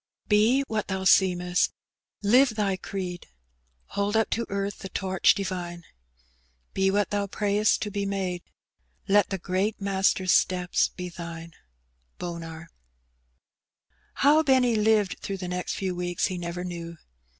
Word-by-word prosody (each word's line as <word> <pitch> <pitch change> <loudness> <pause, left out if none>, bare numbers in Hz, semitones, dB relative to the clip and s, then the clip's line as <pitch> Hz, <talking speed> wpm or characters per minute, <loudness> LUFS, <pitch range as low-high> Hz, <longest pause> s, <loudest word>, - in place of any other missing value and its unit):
Bo 225 +6 +4
nbat 215 -2 -2
(hoa 190 0 -2
seemeBb; 180 -2 +3 0.5
live 250 +6 +5
tbj 200 -4 -1
creed. 180 -3 -5 0.6
Hold 200 +1 -1
Dp 220 0 +2
to 235 - -1
earth 200 0 -3
the 195 - -7
torch 190 -1 +2
divine; 180 -3 -4 0.9
Be 190 0 +2
what 205 +1 +1
thou 205 -1 0
prayest 205 +1 +1
to 210 - -4
be 200 0 -2
made; 190 -3 -2 0.7
Let 205 -1 +4
the 195 - -2
great 190 +4 -1
Master'a 195 -1 +1
ateps 180 0 +2
be 180 -1 -5
thine. 170 -1 -8 0.7
OW 170 -1 -6 1.7
Benny 260 -5 +3
lived 215 -2 +2
through 195 - -4
the 180 -1 -5
next 180 0 -3
few 190 -2 -2
""'weeks 175 +1 -1
lie 185 - -3
never 175 0 -4
knew. 170 -2 -6
190 Hz, 135 wpm, -26 LUFS, 180-205 Hz, 1.7 s, live